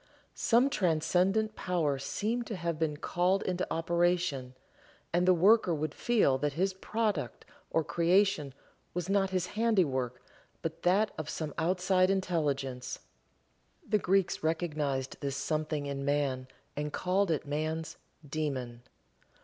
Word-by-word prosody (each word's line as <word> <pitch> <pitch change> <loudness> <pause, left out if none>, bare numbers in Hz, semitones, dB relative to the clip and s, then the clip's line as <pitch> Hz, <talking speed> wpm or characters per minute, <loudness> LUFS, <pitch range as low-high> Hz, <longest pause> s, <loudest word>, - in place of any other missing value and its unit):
Some 245 +4 +3
transcendent 185 - +1
power 160 -7 0
seemed 225 - -2
to 220 - -4
have 170 -3 -3
been 155 -2 0
called 180 +5 +1
into 185 0 -2
operation, 170 -6 0 0.6
and 175 +1 +2
the - - +8
worker 190 0 +5
would 155 -1 -3
feel 205 - +2
that 145 0 0
his 190 +5 0
product 210 -3 -2 0.2
or 165 - +1
creation 170 -4 +2 0.4
was 180 +1 -2
not 195 -1 +2
his 185 -1 0
handiwork, 155 - +1 0.4
but 165 -1 -4
that 200 +4 +3
of 155 - -4
some 155 -3 -4
outside 185 +2 +2
intelligence. 145 -9 -1 0.9
The 210 0 +2
Greeks 195 -1 +1
recognized 150 -5 -1
this 140 -1 -2
something 155 0 -1
in 140 -1 -3
man, 140 -2 0 0.3
and 150 0 -3
called 185 +4 +1
it 160 -3 0
man's 155 +2 -3 0.3
"Daemon." 135 -5 -3
165 Hz, 130 wpm, -31 LUFS, 145-190 Hz, 0.9 s, the